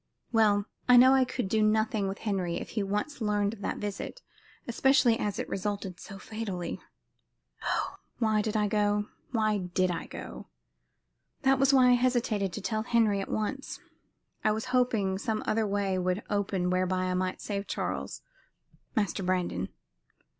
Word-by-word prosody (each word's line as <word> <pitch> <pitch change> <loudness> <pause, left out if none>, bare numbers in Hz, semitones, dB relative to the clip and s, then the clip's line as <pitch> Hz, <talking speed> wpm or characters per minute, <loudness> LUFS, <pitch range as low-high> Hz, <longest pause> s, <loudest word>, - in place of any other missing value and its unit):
"Well, 210 -3 +4 0.2
I 250 - +9
knew 255 +2 +8
I 265 -1 +5
could 250 -4 -3
do 220 +3 +1
nothing 215 -1 +2
with 195 +1 -3
Henry 185 -5 0
if - - -7
he 220 - -2
once 210 +8 -2
learned 205 -1 +1
of 215 - -11
that - - -2
visit, 210 - -5 0.4
especially 245 -1 +4
as 205 -1 -1
it - - -3
resulted 195 -2 -3
so 195 - -9
fatally. 195 -4 -5 0.8
Oh! - - -1 0.2
why 220 -2 +2
did 215 +1 -1
I 210 -1 +2
go? 205 0 +1 0.2
Why 215 -3 +1
did 180 0 0
I 170 - -4
go? - - -8 1.0
That 270 0 +4
was 275 0 +5
why 260 -2 +6
I - - +7
hesitated 240 -6 +1
to 210 - -4
tell 215 +3 -1
Henry 220 -3 +2
at - - -6
once. 265 +6 -3 0.6
I - - +4
was 220 +2 -3
hoping 220 -7 +2
some 220 0 -2
other 220 0 +1
way 200 -2 0
would 185 +3 -1
open 195 -3 0
whereby 185 0 +1
I 185 0 0
might 185 0 -1
save 200 -1 -4
Charles - - -3 0.7
Master 205 -3 0
Brandon. 180 - -1
210 Hz, 165 wpm, -29 LUFS, 195-225 Hz, 1.0 s, I